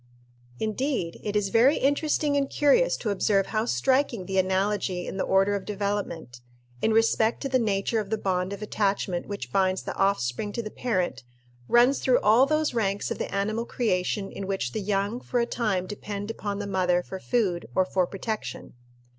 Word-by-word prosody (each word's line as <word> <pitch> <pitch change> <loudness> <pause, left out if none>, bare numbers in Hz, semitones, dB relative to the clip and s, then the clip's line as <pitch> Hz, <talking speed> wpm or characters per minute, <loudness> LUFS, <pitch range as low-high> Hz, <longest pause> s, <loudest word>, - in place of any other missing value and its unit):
Indeed, 220 - -2
it 210 0 -4
is 205 -2 +1
very 245 +8 +4
interesting 290 +1 +1
and 275 -1 +1
curious 480 - +3
to 215 - -2
observe 195 0 +2
how 215 +1 +1
striking 260 -5 +1
the 190 +1 0
analogy 190 -1 0
in - - -5
the - - 0
order 195 +1 +3
of 200 -1 -2
development, 200 -11 -4 0.4
in 220 - +2
respect 225 0 +3
to 275 - -2
the 260 -1 +2
nature 215 0 0
of 205 -2 -4
the 220 - 0
bond 185 -2 -1
of 200 +1 -6
attachment 195 -4 -1
which 205 -1 -6
binds 190 -1 +1
the - - -4
offspring 195 - 0
to 235 - -3
the 215 - -6
parent, 185 - -2 0.4
runs 245 +3 +4
through 255 -1 +3
all 230 +6 +5
those 305 -1 +1
ranks 205 -3 -1
of - - -3
the - - -3
animal 215 +3 -1
creation 195 -3 -1
in 195 - -6
which 195 -11 -2
the 215 - -3
young 200 +3 -1
for 250 - -2
a 235 - +2
time 210 -7 -1
depend 205 +1 -5
upon 205 -2 -4
the 205 - -4
mother 180 -2 +1
for 190 - -7
food 185 - 0
or 185 - +3
for 185 -1 0
protection. 215 +3 -5
205 Hz, 190 wpm, -26 LUFS, 190-230 Hz, 0.4 s, all